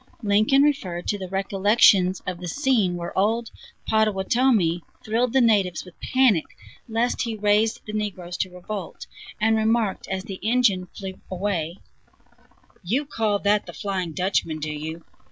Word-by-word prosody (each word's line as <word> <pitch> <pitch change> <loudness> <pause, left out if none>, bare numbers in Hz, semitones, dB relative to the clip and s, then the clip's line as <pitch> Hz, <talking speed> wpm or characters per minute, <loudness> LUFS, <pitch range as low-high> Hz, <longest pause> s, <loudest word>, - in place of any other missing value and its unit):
Lincoln 215 +7 +4
referred 185 -13 0
to 205 - -1
the 185 -1 -6
recollections 195 -1 +3
of 180 -1 -4
the 180 - -6
scene, 225 - +1
where 170 0 -6
old 225 +4 +1 0.4
"Pottowatomie" 215 -3 +2 0.2
thrilled 230 +2 +1
the 265 +1 +3
natives 200 -8 +2
with 180 - -13
panic 255 -11 +3 0.4
lest 230 +2 0
he 230 -2 -2
raised 210 +1 +2
the 210 - -7
negroes 185 -5 -4
to 185 - -1
revolt, 180 +1 -7 0.3
and 220 +1 +3
remarked, 220 -2 0
as 190 -1 -3
the 190 -1 -7
engine 215 -5 +2
flew 190 -1 -7
away: 180 -3 -2 1.0
"You 235 +11 -1
call 220 -7 0
that 205 0 +2
'The - - -8
Flying 185 -5 -3
Dutchman' 180 -3 0
do 155 0 -4
you? 160 +2 -6
200 Hz, 150 wpm, -24 LUFS, 180-225 Hz, 1.0 s, Lincoln